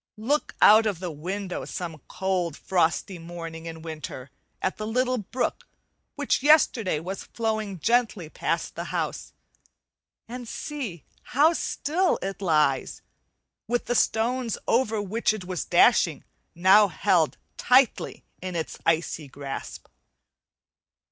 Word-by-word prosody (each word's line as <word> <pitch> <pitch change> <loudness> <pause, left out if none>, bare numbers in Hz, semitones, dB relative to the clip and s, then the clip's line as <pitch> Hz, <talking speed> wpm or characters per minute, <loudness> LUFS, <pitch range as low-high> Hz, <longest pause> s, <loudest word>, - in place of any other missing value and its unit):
Look 275 +8 -1
out 215 +1 +8
of 200 -5 -2
the 180 -2 -4
window 180 +5 -4
some 170 -5 -6
cold 180 -5 -1
frosty 175 +1 0
morning 165 -1 -8
in 160 -1 -8
winter, 150 -5 -7 0.3
at 190 - -2
the 215 - -4
little 250 +2 +1
brook 245 +5 -3 0.5
which 290 -2 0
yesterday 255 - +4
was 185 +4 -6
flowing 220 -4 -2
gently 225 -2 +1
past - - -2
the - - -5
house, - - -3 1.0
and 245 +1 -7
see 235 - -5 0.3
how 310 +4 +6
still 345 +3 0
it 195 +1 -4
lies, 150 -7 +1 0.6
with 240 +1 0
the 245 - 0
stones 235 0 +1
over 225 -3 +2
which 215 +2 0
it 190 -4 -8
was 180 -2 -3
dashing - - +4 0.3
now 190 +4 +6
held 175 -3 +1 0.2
tightly 255 -1 +2 0.2
in 185 -1 -5
its 160 -2 -4
icy 160 -2 0
grasp. 135 0 -7
195 Hz, 125 wpm, -26 LUFS, 165-235 Hz, 1.0 s, out